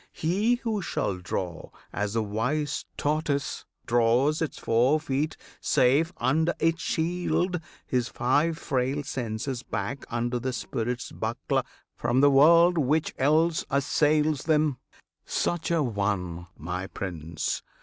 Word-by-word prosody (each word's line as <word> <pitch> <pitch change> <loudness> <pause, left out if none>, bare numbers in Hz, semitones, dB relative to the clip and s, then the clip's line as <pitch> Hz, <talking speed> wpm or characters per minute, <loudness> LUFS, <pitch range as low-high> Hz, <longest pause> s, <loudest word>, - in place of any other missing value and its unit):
He 200 +9 +1
who 220 -4 -1
shall 95 - -2
draw 90 -2 -4 0.2
As 105 +1 -2
the 115 - +2
wise 125 +9 -1
tortoise 145 -1 -1 0.2
draws 120 +6 +3
its 160 - -2
four 125 +7 +3
feet 150 +1 -2 0.2
safe 140 +7 +3
Under 160 +7 +1
its 165 0 +1
shield, 180 +1 0 0.2
his 125 -2 0
five 145 +6 +1
frail 135 -1 -1
senses 125 -1 -3
back 110 +4 -4
Under 120 +1 -1
the 130 +2 -2
spirit's 120 0 -3
buckler - - -1 0.3
from 125 - +1
the 145 +1 +6
world 170 +5 +6
Which 150 +3 +1
else 160 +4 +3
assails 150 +1 +2
them, 150 -4 +2 0.4
such 175 -1 -1
an 150 -9 +1
one, 90 -4 -2
my 90 +5 -4
Prince! 85 -5 -4
135 Hz, 125 wpm, -27 LUFS, 115-155 Hz, 0.4 s, the